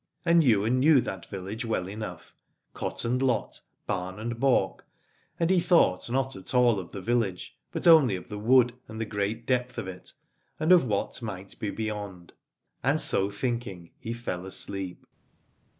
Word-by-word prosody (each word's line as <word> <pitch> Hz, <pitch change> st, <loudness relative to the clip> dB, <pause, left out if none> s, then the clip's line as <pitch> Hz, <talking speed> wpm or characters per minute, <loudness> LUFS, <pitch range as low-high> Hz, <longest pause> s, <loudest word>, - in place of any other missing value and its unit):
And 170 Hz, -1 st, +5 dB
Ywain 115 Hz, 0 st, +3 dB
knew 145 Hz, +1 st, +6 dB
that 95 Hz, -6 st, -6 dB
village 100 Hz, +5 st, -5 dB
well 110 Hz, -6 st, -1 dB
enough, 100 Hz, -3 st, -7 dB, 0.4 s
cot -, -, -4 dB
and 125 Hz, +2 st, 0 dB
lot, 125 Hz, -5 st, 0 dB, 0.2 s
barn 95 Hz, 0 st, -3 dB
and 115 Hz, +2 st, -4 dB
balk, 135 Hz, 0 st, +2 dB, 0.6 s
and 170 Hz, +1 st, +2 dB
he 185 Hz, -, +5 dB
thought 165 Hz, -, +3 dB
not 135 Hz, 0 st, -1 dB
at 95 Hz, +6 st, -7 dB
all 120 Hz, -4 st, +4 dB
of 90 Hz, -, -8 dB
the 100 Hz, -, -6 dB
village, 115 Hz, -6 st, -1 dB, 0.2 s
but -, -, -4 dB
only 155 Hz, -, +7 dB
of 90 Hz, -, -8 dB
the 105 Hz, -3 st, -6 dB
wood 120 Hz, +2 st, +4 dB
and 110 Hz, 0 st, -8 dB
the 115 Hz, -, -1 dB
great 105 Hz, +2 st, -3 dB
depth 125 Hz, 0 st, 0 dB
of -, -, -4 dB
it 90 Hz, -1 st, -9 dB, 0.5 s
and 160 Hz, +3 st, +2 dB
of 180 Hz, -6 st, +7 dB
what 105 Hz, +2 st, -2 dB
might 100 Hz, -4 st, -7 dB
be 105 Hz, -, -2 dB
beyond. 105 Hz, -5 st, -5 dB, 0.5 s
And -, -, +2 dB
so 95 Hz, +1 st, +3 dB
thinking 105 Hz, -5 st, -4 dB
he 115 Hz, -, -5 dB
fell 95 Hz, -6 st, -4 dB
asleep. 95 Hz, -1 st, -4 dB
110 Hz, 170 wpm, -27 LUFS, 95-125 Hz, 0.6 s, only